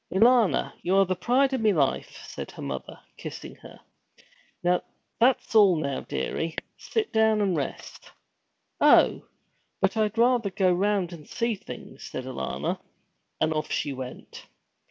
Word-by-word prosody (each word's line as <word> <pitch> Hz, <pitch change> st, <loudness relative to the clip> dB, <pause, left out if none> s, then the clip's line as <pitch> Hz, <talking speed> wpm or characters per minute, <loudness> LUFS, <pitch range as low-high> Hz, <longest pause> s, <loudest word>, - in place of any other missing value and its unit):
'Alanna, 230 Hz, +2 st, +4 dB
you're 195 Hz, +2 st, +3 dB
the 185 Hz, 0 st, -1 dB
pride 265 Hz, +6 st, +2 dB
of 260 Hz, -, 0 dB
me 215 Hz, -1 st, +4 dB
life,' 140 Hz, -6 st, -1 dB
said -, -, -7 dB
her -, -, -10 dB
mother, 65 Hz, -, -6 dB, 0.2 s
kissing -, -, -8 dB
her. -, -, -14 dB, 0.8 s
'That's 230 Hz, +9 st, 0 dB
all 205 Hz, -5 st, +6 dB
now, 140 Hz, -4 st, -2 dB
dearie. 160 Hz, -, -3 dB, 0.2 s
Sit 445 Hz, -2 st, -3 dB
down 220 Hz, -1 st, +4 dB
and 195 Hz, -4 st, +1 dB
rest.' 140 Hz, -4 st, -5 dB, 0.7 s
'Oh, -, -, +5 dB, 0.6 s
but 195 Hz, +2 st, +1 dB
I 215 Hz, -1 st, +3 dB
'd 210 Hz, +2 st, -11 dB
rather 235 Hz, -2 st, +3 dB
go 185 Hz, -1 st, +2 dB
round 190 Hz, -1 st, 0 dB
and 155 Hz, -3 st, -12 dB
see 235 Hz, -1 st, 0 dB
things,' 190 Hz, -11 st, -10 dB
said 130 Hz, -, -6 dB
Alanna, 125 Hz, -, -3 dB, 0.6 s
and 155 Hz, -, +2 dB
off 155 Hz, -1 st, -3 dB
she 145 Hz, -, -1 dB
went. 130 Hz, -1 st, -9 dB
190 Hz, 145 wpm, -26 LUFS, 155-225 Hz, 0.8 s, all